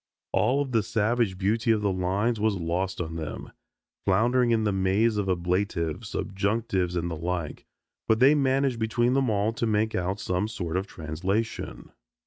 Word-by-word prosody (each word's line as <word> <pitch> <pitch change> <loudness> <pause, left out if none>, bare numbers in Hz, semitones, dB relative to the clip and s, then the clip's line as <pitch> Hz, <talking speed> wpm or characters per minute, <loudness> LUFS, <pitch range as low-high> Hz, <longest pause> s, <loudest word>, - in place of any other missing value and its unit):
All 130 +6 +2
of 135 - -8
the 115 -2 +3
savage 110 -1 0
beauty 110 +5 0
of 110 -2 +3
the 100 - +2
lines 95 +5 0
was 110 -1 +2
lost 90 +2 -2
on 80 -1 -4
them, 80 -2 -6 0.5
floundering 120 +6 +3
in 115 -1 +2
the 105 - +1
maze 95 +4 +2
of 100 -2 -1
ablatives, 90 -2 -1
subjunctives 100 -2 -1
and 85 0 -1
the - - -2
like. 85 -1 -4 0.4
But 110 0 +3
they 135 +4 +7
managed 135 -3 +1
between 120 +2 +1
them 135 -2 +2
all 105 +1 +1
to 115 - -1
make 110 +1 +1
out 95 +2 -1
some 90 +2 -1
sort 90 -6 -4
of 95 +2 -1
translation. 95 +8 -3
105 Hz, 170 wpm, -27 LUFS, 90-115 Hz, 0.5 s, they